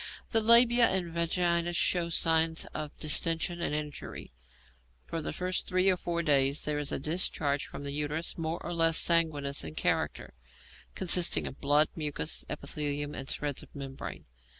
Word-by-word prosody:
The 225 - +3
labia 235 +1 +7
and 180 -3 0
vagina 170 0 0
show 170 0 +1
signs 165 0 +2
of 155 -1 -6
distension 165 +2 0
and 150 - -1
injury. 150 - -7 0.7
For 165 - -4
the - - -4
first 180 0 -3
three 185 +1 +2
or - - +1
four 170 -1 -3
days 140 -2 +2
there 150 -1 -1
is 145 -1 -2
a - - -1
discharge 145 -2 -1
from - - -9
the 140 - -4
uterus 150 +3 -3
more 165 0 -3
or 175 - -4
less 165 -1 +3
sanguineous 150 -5 +2
in 80 -1 -8
character, - - -1 0.6
consisting 180 -2 +3
of 135 - -9
blood, 145 +2 +3
mucus, 155 0 -3
epithelium, 145 0 -4
and 135 -1 -6
shreds 145 -2 -3
of - - -17
membrane. 135 -1 -8
160 Hz, 160 wpm, -29 LUFS, 145-175 Hz, 0.7 s, labia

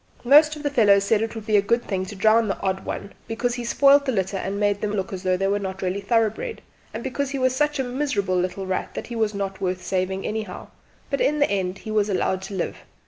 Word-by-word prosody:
Most 300 +4 +6
of 300 - -9
the 290 - 0
fellows 205 -6 +5
said 210 +1 +2
it 225 0 -3
would 220 -2 -7
be 215 -2 +3
a - - +5
good 235 +4 +1
thing 190 -2 -2
to 205 - -8
drown 220 +3 +4
the 195 - -2
odd 190 -1 -2
one 200 - -5
because 240 +2 -1
he 245 0 -4
spoilt 280 +4 +5
the 265 - +1
litter 195 -3 -1
and 195 +1 -3
made 205 -1 +1
them 210 -1 -1
look 195 -1 -2
as 185 - -5
though 185 -1 +1
they 195 - -1
were 200 +1 +1
not 190 -1 -5
really 185 +2 -1
thorough¬bred, 225 - 0 0.3
and 225 +2 -6
because 265 +1 -2
he 275 - -3
was 255 -1 +1
such 295 +2 +1
a 265 - 0
miserable 245 -8 -1
little 180 +2 -1
rat 185 0 -3
that - - -4
he 240 - -7
was 220 -2 0
not 195 -1 -4
worth 185 -1 -2
saving 190 +1 -2
anyhow; 215 -4 -5 0.4
but 275 - 0
in 300 - +2
the 285 -6 +2
end 190 -1 -1
he 215 - -7
was 210 -1 +1
allowed 190 -1 0
to 195 +1 -7
live. 180 - -3
205 Hz, 260 wpm, -23 LUFS, 190-245 Hz, 0.4 s, Most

